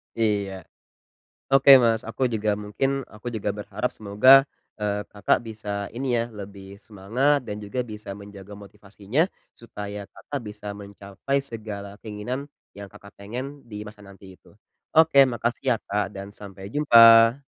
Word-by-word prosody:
Iya. 105 -4 0 1.0
Oke 135 +1 +6
Mas, 115 -1 +2
aku 115 +3 -7
juga 105 0 0
mungkin 105 +6 -2 0.2
aku 115 +3 -7
juga 105 -1 -2
berharap 105 +3 -3
semoga, 110 +6 +6 0.3
eee, 105 -1 -2
Kakak 100 -2 +1
bisa 105 -2 -5
ini 135 +3 -4
ya - - +1
lebih 100 -1 -10
semangat 120 +7 0
dan 105 - -5
juga 105 +5 -4
bisa 105 -2 -7
menjaga 100 0 -12
motivasinya, 105 - -3 0.2
supaya 105 -3 -8
Kakak 145 - -6
bisa 105 0 -8
mencapai 100 +6 -4
segala 105 -6 -6
keinginan 120 +7 -6 0.3
yang 100 -1 -9
Kakak 100 - -15
pengen 130 +8 -7
di 105 0 -7
masa 105 0 -12
nanti 95 -1 -14
itu. - - -22 0.5
Oke 160 -3 +5
makasih 120 +1 -2
ya, - - +1
Kak 100 0 -1
dan 100 0 -8
sampai 95 -1 -9
jumpa. 115 -2 +7
105 Hz, 145 wpm, -24 LUFS, 100-120 Hz, 1.0 s, jumpa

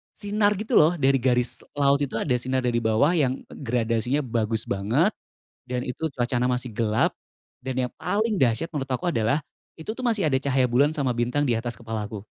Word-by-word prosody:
sinar 205 0 +1
gitu 215 +5 0
loh 160 +3 +5
dari 135 -3 +3
garis 125 -1 +1 0.2
laut 140 0 +3
itu, 140 -2 -3
ada 125 - -2
sinar 130 +1 0
dari 120 -1 +1
bawah 110 +8 +2
yang 130 -3 +1
gradasinya 120 +2 -1
bagus 110 -2 0
banget 120 - +1 0.6
dan 125 0 -2
itu 145 +6 -3
cuacanya 125 0 0
masih 125 -1 -1
gelap 110 0 +1 0.5
dan 130 0 -4
yang - - -10
paling 205 +5 0
dahsyat 125 +6 +1
menurut 140 -3 -3
aku 155 +7 -1
adalah 115 +4 +1 0.3
itu 160 +6 -7
tuh 255 +2 -7
masih 220 -6 +1
ada 130 - +2
cahaya 135 -1 +1
bulan 145 +5 +3
sama 140 -5 +1
bintang 120 +5 0
di 125 - +1
atas 120 0 -3
kepalaku. 110 -3 -5
130 Hz, 185 wpm, -25 LUFS, 120-150 Hz, 0.6 s, loh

